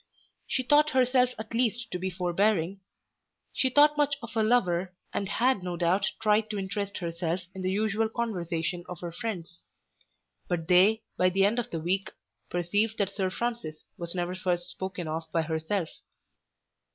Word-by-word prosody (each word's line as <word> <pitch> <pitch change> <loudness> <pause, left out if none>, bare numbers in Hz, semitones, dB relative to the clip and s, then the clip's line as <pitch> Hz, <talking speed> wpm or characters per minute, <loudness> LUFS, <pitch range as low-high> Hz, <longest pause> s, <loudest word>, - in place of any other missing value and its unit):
She 260 - 0
thought 295 +4 +5
herself 255 -2 +4
at 220 +1 -7
least 240 0 0
to 180 - -3
be 190 +1 -1
forbearing. 185 +1 +1 0.7
She 260 - +2
thought 295 +3 +5
much 290 -1 +3
of 230 - -7
her 225 - +2
lover, 185 -6 +2 0.2
and 195 - -2
had 250 -1 +2
no 180 -1 -4
doubt 185 +4 +2
tried 215 0 +2
to 210 - -3
interest 200 +1 -3
herself 170 +1 -2
in 190 - -6
the 185 - 0
usual 215 +2 +1
conversation 175 -7 -2
of 180 -3 -6
her 175 -1 -4
friends. 175 -5 -5 0.9
But 170 -3 -2
they, 195 +5 +5
by 185 - +4
the 195 +2 +3
end 220 +4 +2
of 240 - -3
the 165 - -3
week, 190 +5 0 0.4
perceived 205 +6 0
that 200 -2 0
Sir 195 -2 -1
Francis 230 -8 -4
was 170 +1 -6
never 175 0 -1
first 180 -1 -1
spoken 185 -2 -5
of 160 +1 -4
by 165 0 +1
herself. 160 +3 -1
190 Hz, 170 wpm, -28 LUFS, 175-225 Hz, 0.9 s, thought